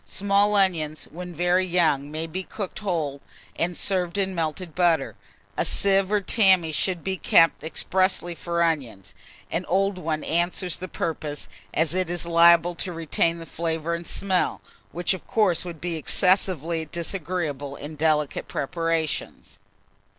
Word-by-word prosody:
Small 200 +1 +1
onions, 165 -6 +1
when 180 +1 -7
very 175 +2 +2
young, 160 -6 +1
may 155 +2 -3
be 165 +4 -5
cooked 195 0 -6
whole, 160 -9 -2 0.3
and 175 +1 -1
served 185 -1 -1
in 190 -1 0
melted 165 0 -3
butter. 175 -2 +1 0.4
A - - +1
sieve 195 0 +2
or 210 -1 +2
tammy 190 -5 +3
should 175 +2 -1
be 190 0 -2
kept 165 -3 +4
expressly 175 +2 0
for 170 0 -1
onions: 130 - -2 0.4
an 165 +3 -1
old 195 +1 +1
one 155 -2 -2
answers 175 +1 -1
the 185 - -6
purpose, 155 -4 -4 0.2
as 160 +1 +1
it 185 -1 0
is 175 -1 -1
liable 170 +1 +5
to 180 +2 -4
retain 165 0 0
the 165 - -9
flavour 165 0 -3
and 170 0 -5
smell, 190 -2 0 0.3
which 175 +3 0
of 185 - -8
course 195 -8 +2
would 170 -3 -8
be 170 0 -2
excessively 170 -1 +3
disagreeable 160 -4 -4
in 150 +3 -8
delicate 150 -1 0
preparations. 165 +1 -3
170 Hz, 150 wpm, -24 LUFS, 160-185 Hz, 0.4 s, liable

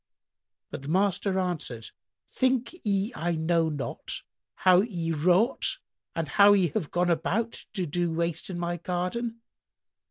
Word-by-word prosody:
But - - -6
the 140 - -9
master 190 +2 +1
answered, 155 -11 -3 0.4
"Think 255 +1 +1
ye 200 +2 0
I 170 +1 -1
know 165 0 +2
not 145 -3 -5 0.3
how 185 -1 +5
ye 175 -7 -2
wrought 180 - +2 0.4
and 165 -2 -1
how 200 +7 +6
ye 190 -4 +3
have 165 -2 -2
gone 175 0 +1
about 195 +8 -1
to 190 -4 -1
do 170 +2 -1
waste 170 +2 -2
in 180 - -4
my 175 0 -2
garden? 185 +7 -3
180 Hz, 145 wpm, -27 LUFS, 165-200 Hz, 0.4 s, how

